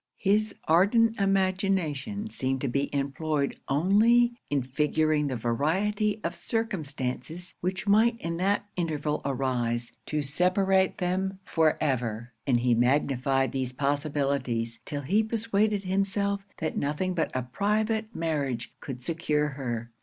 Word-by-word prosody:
His 210 +1 +1
ardent 220 +7 +4
imagination 195 -1 0
seemed 130 0 -1
to 140 - 0
be 140 +3 0
employed 140 +1 -1
only 215 - +4 0.2
in 140 -3 +1
figuring 150 +3 +1
the 130 - -2
variety 190 - 0
of - - -1
circumstances 170 - -3
which 185 +2 -2
might 225 +3 +4
in 165 -4 -3
that 200 +3 +1
interval 155 -4 -1
arise 125 -3 -1 0.2
to 150 -1 -1
separate 190 +5 +2
them 190 +2 -1
for 160 -2 +2
ever; 120 -4 -1 0.2
and 120 -3 +3
he 125 0 +3
magnified 135 +2 +2
these 130 -2 -2
possibilities, 140 -5 -1
till 145 -1 -4
he 195 +11 +2
persuaded 215 -2 0
himself 200 +1 0 0.2
that 155 - -2
nothing 150 +6 -1
but 170 - 0
a 130 - 0
private 215 - -1
marriage 140 -8 -2
could 125 -3 -7
secure 150 -1 0
her. 120 -4 -4
155 Hz, 130 wpm, -28 LUFS, 135-195 Hz, 0.2 s, ardent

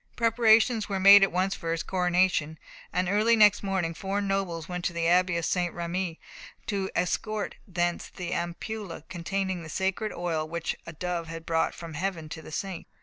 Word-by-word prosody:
Preparations 225 -1 +4
were 200 - -1
at 195 +1 +8
once 185 +2 +1
made - - -8
for 165 - -3
his 165 - -2
coronation, 180 -4 +1 0.3
and 180 0 0
early 215 +5 +4
next 210 -2 +6
morning 190 -4 -1
four 195 +4 -2
nobles 195 -5 -2
went 180 -1 -4
to 175 - 0
the 170 -1 0
abbey 180 0 +3
of 170 - -1
St. 175 -2 0
Rémi 170 0 -3 0.5
to 195 -3 -2
escort 210 +4 -1
thence 175 -2 -1
the 180 -2 -5
ampulla 175 +1 -4
containing 190 +1 -2
the 160 - -9
sacred 190 +5 -1
oil 165 -3 -2
which 170 0 -3
a 170 - -7
dove 170 0 -3
had 165 0 -7
brought 165 -1 0
from 165 -2 -8
heaven 165 -1 -3
to 160 - -7
the 155 - -11
saint. 190 +2 -5
180 Hz, 185 wpm, -27 LUFS, 170-195 Hz, 0.5 s, at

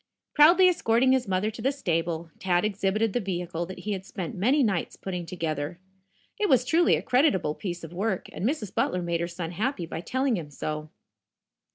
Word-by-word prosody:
Proudly 340 +5 +7
escorting 260 -7 +3
his 260 -3 +2
mother 195 +3 0
to 220 - -9
the 270 - +2
stable, 165 - -2
Tad 180 0 +1
exhibited 210 +1 0
the - - +1
vehicle 175 -4 -3
that 185 -1 -8
he 210 - -4
had 190 -2 -3
spent 185 -3 -6
many 255 +10 +2
nights 195 -7 -1
putting 180 -3 -5
together. 160 -2 -3 0.6
It 415 -2 +1
was 250 -1 +4
truly 330 +6 +4
a - - -3
creditable 245 - +2
piece 175 0 -5
of 165 +1 -8
work, 195 +1 -2
and - - -6
Mrs. 230 -4 -1
Butler 180 0 0
made 170 -1 -1
her 170 - -1
son 170 -1 -5
happy 210 0 -2
by 165 - -5
telling 260 +3 0
him 155 -4 -6
so. 155 +1 -5
190 Hz, 195 wpm, -27 LUFS, 170-245 Hz, 0.6 s, Proudly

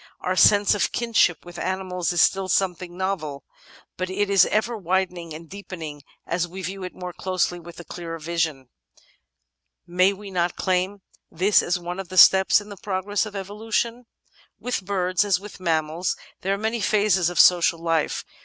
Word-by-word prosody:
Our 185 - -1
sense 200 +3 +5
of 205 - 0
kinship 230 -9 +1
with 175 0 -9
animals 185 -2 -2
is 175 - +2
still 195 -1 +2
something 180 -2 -1
novel, 175 -7 -3 0.5
but 185 0 -3
it 200 +1 -1
is 195 - +6
ever 220 +3 0
widening 180 -3 -2
and 160 +2 -9
deepening 165 -6 -8 0.2
as 175 +1 -1
we 190 +2 -8
view 190 +1 -5
it 180 - -7
more 180 -1 -7
closely 185 -1 -1
and 170 - -14
with 170 0 -11
clearer 165 -2 -6
vision: 160 -5 -2 1.2
may 185 +2 +3
we 200 0 -9
not 175 -1 0
claim 185 +1 -1 0.3
this 195 +5 +3
as 175 +1 0
one 175 +1 -6
of 195 - -6
the 185 - -6
steps 190 +2 +7
in 205 0 -12
the 200 - -9
progress 205 +1 -2
of 210 - -10
Evolution? 225 +4 -3 0.5
With 245 -5 -3
birds, 185 -1 0
as 200 -3 +1
with 205 0 -11
mammals, 165 0 -1 0.2
there 195 +1 0
are - - -6
many 220 +2 -2
phases 200 -5 +2
of 175 - -3
social 175 -1 +5
life. 165 -2 -1
185 Hz, 175 wpm, -24 LUFS, 175-200 Hz, 1.2 s, steps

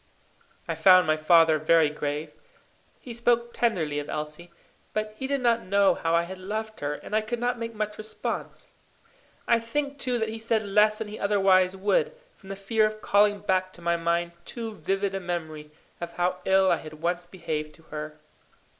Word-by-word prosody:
I - - -1
found 185 -2 +6
my 155 0 +3
father 160 0 +5
very 155 -1 +4
grave. 150 +1 -4 0.7
He 245 - -9
spoke 235 0 +1
tenderly 165 -11 0
of 145 - -6
Elsie; 150 +3 -5 0.4
but 215 0 -2
he 265 +4 -4
did 280 -1 -1
not 235 -1 +3
know 195 0 +3
how 165 -1 0
I 170 - +3
had 185 +2 -8
loved 215 +3 -5
her, 145 0 -2
and 210 - -6
I 215 - +3
could 220 +3 -3
not 245 0 -1
make 230 -1 -5
much 210 0 -3
response. 215 0 -5 0.8
I 235 -1 +4
think, 280 +5 -3
too, 250 -2 0
that 220 -1 -1
he 225 0 -6
said 225 -1 0
less 210 +2 +3
than 220 - -4
he 210 +1 -8
otherwise 195 -2 +3
would, 460 - +1 0.2
from 190 - -16
the 195 - -4
fear 215 +3 +2
of 215 0 -8
calling 205 0 +3
back 185 -2 0
to 175 - -14
my 170 0 +2
mind 170 +1 0
too 225 +1 -6
vivid 195 +2 -1
a 195 - -2
memory 160 -4 -5 0.3
of 170 0 -5
how 180 +1 0
ill 190 -1 +4
I 170 - +3
had 155 0 -10
once 175 +2 -2
behaved 155 -4 -5
to 160 - -20
her. 150 0 -6
195 Hz, 195 wpm, -26 LUFS, 170-220 Hz, 0.8 s, found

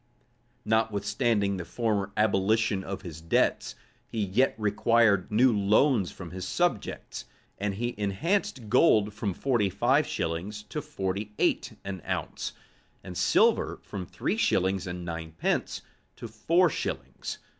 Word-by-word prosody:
Notwithstanding 105 -1 +1
the 90 - -4
former 100 +1 -1
abolition 105 0 +2
of 100 +1 -6
his 80 -4 -8
debts, 80 - +1 0.3
he 110 -2 -2
yet 115 +8 +2
required 105 -1 +3
new 120 +2 +4
loans 105 +1 +3
from 90 -3 -9
his 95 0 -5
subjects; 175 - -2 0.3
and 100 0 -1
he 120 +3 -2
enhanced 130 - -1
gold 110 -4 +4
from 105 -3 -3
forty 120 -7 +1
five 125 +10 +2
shillings 95 +6 -3
to 150 - -3
forty 105 -7 -4
eight - - +1
an 95 -2 -5
ounce, - - -3 0.5
and 90 -2 -8
silver - - +3
from 95 -3 -6
three - - -2
shillings 95 0 +1
and 90 0 -5
nine 80 -1 -5
pence - - -1 0.3
to - - -8
four 165 - +3
shillings. - - -4
105 Hz, 135 wpm, -28 LUFS, 95-115 Hz, 0.5 s, new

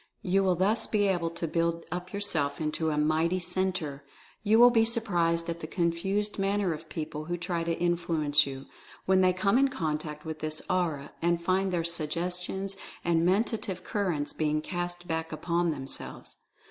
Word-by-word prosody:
You 195 +1 +2
will 185 -2 +3
thus 200 +6 +1
be 210 -2 +1
able 175 -3 +1
to 170 0 -4
build 165 +1 0
up 180 +1 -4
yourself 175 -8 -1
into 160 +1 -1
a 150 - -1
mighty 160 +4 +2
Centre. 180 -5 -1 0.4
You 215 +1 +4
will 245 +1 +8
be 225 -2 +4
surprised 175 -8 +2
at 170 0 -3
the 155 - -6
confused 190 +5 -1
manner 195 -2 +1
of 155 +1 -9
people 155 -1 -5
who 175 +2 -2
try 175 -1 -2
to 165 0 -1
influence 165 -4 +2
you, 135 0 -7 0.4
when 190 0 +4
they 185 0 +5
come 200 +6 +2
in 275 - +5
contact 155 - -3
with 160 -1 -5
this 155 0 -1
Aura, 165 -6 -1
and 170 0 +2
find 185 +2 +1
their 175 -2 0
Suggestions 180 +4 -3 0.3
and 165 -1 +3
Mentative 195 -2 0
Cur 200 -1 -1
rents 145 -3 -2
being 155 -1 0
cast 175 +1 -4
back 160 -1 -2
upon 170 +2 0
themselves. 135 -4 -4
170 Hz, 175 wpm, -29 LUFS, 160-190 Hz, 0.4 s, will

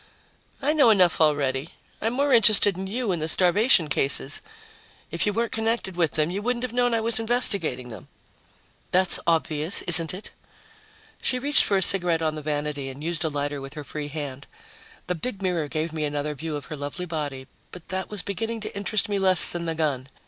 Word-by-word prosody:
"I 295 +3 +2
know 290 -6 +5
enough 185 -6 +4
already. 145 -1 +1 0.3
I'm 225 +2 -1
more 280 +1 +1
interested 215 -4 +5
in 190 +1 -5
you 230 +1 -2
and 170 -3 -2
the 155 - -1
starvation 180 +1 +3
cases. 135 0 +1 0.7
If - - 0
you - - +2
weren't 230 +2 -1
connected 225 -4 -1
with 165 -5 +1
them, 155 +2 +1
you 195 +3 -3
wouldn't 240 +2 -1
have 250 -2 -3
known 245 -1 +2
I 225 - 0
was 230 0 +2
investigating 205 - +1
them." 110 -5 -10 0.8
"That's 185 0 +2
obvious, 160 +1 +1
isn't 165 -1 +4
it?" 185 +4 -8 0.9
She 255 - +1
reached 285 +3 +2
for 200 - +2
a 190 - +5
cigarette 175 -4 +2
on 155 -1 0
the 155 - -6
vanity 145 -2 -3
and 135 +3 -9
used 170 0 -2
a 160 - 0
lighter 145 -1 -3
with 135 +2 -9
her 150 - -6
free 150 +1 -6
hand. 145 -2 -6 0.6
The 180 - -1
big 195 +5 -5
mirror 175 -5 0
gave 155 +2 -3
me 155 -1 -3
another 145 0 -2
view 155 +2 -5
of 145 - -6
her 155 - -6
lovely 145 +5 -5
body, 145 -5 -4 0.3
but 180 -2 -11
that 190 0 -3
was 210 -3 -1
beginning 225 +3 -3
to 215 - -6
interest 200 +2 0
me 205 -1 -1
less 185 -2 +5
than 170 -1 -4
the 165 - -2
gun. 140 -5 -1
170 Hz, 205 wpm, -25 LUFS, 150-210 Hz, 0.9 s, know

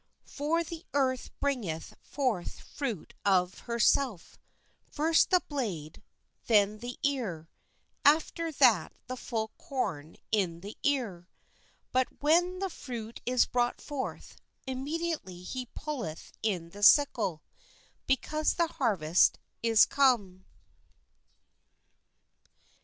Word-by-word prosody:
For 315 +4 -1
the 335 +1 -8
earth 260 -2 +1
bringeth 215 - -2
forth 250 -11 -2
fruit 235 - -5
of 185 -2 +2
herself; 235 -3 +1 0.5
first 320 +2 +3
the 365 -1 +4
blade, 190 - -4 0.5
then 210 -1 +4
the 245 +2 -6
ear, 215 - -2 0.5
aft 305 +3 +4
er 330 -1 -1
that 235 - +4
the 255 - -5
full 225 -3 -3
corn 160 - -4
in 180 -6 0
the 205 +3 -8
ear. 215 -11 -1 0.6
But 255 0 +2
when 350 +5 +3
the 385 +1 -2
fruit 235 -6 -7
is 250 0 +4
brought 245 0 0
forth, 285 -3 -6 0.3
immediately 270 - -3
he 250 +6 -5
putteth 240 - -6
in 180 -6 -2
the 205 - -11
sickle, 210 - +5 0.6
be 270 - +4
cause 305 +4 -1
the 340 - +3
harvest 195 - +2 0.2
is 225 -1 +6
come. 235 -10 +2
245 Hz, 110 wpm, -30 LUFS, 190-285 Hz, 0.6 s, is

